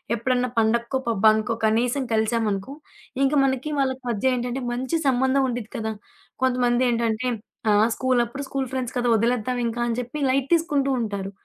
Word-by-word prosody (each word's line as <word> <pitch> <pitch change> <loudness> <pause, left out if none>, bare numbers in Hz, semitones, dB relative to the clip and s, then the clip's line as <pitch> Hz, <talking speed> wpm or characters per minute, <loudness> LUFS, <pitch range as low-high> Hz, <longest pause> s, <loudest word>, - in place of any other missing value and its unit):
ఎప్పుడన్నా 250 +2 0
పండక్కో 235 +3 +1
పబ్బానుకో 220 0 +3
కనీసం 240 +5 +1
కలిసామనుకో. 220 +1 0 0.5
ఇంక 275 - +2
మనకి 265 +3 -1
వాళ్ళకి 260 -1 -1
మధ్య 235 +4 +1
ఏంటంటే 245 +2 -3
మంచి 260 +6 -1
సంబంధం 265 +1 +2
ఉండిద్ది 235 -3 -5
కదా! 220 0 -3 0.5
కొంతమంది 250 -1 +2
ఏంటంటే 230 +1 0 0.4
ఆహ్, 210 +2 +4
స్కూలప్పుడు 255 +1 0
స్కూలు 270 -1 -2
ఫ్రెండ్స్ 255 -2 -3
కదా! 245 0 0
వదిలేద్దాం 240 +2 0
ఇంకా 230 +1 -4
అని 230 - -1
చెప్పి 250 +5 -7
లైట్ 265 0 +2
తీసుకుంటూ 295 -5 +1
ఉంటారు. 200 -3 -4
245 Hz, 145 wpm, -24 LUFS, 225-260 Hz, 0.5 s, ఆహ్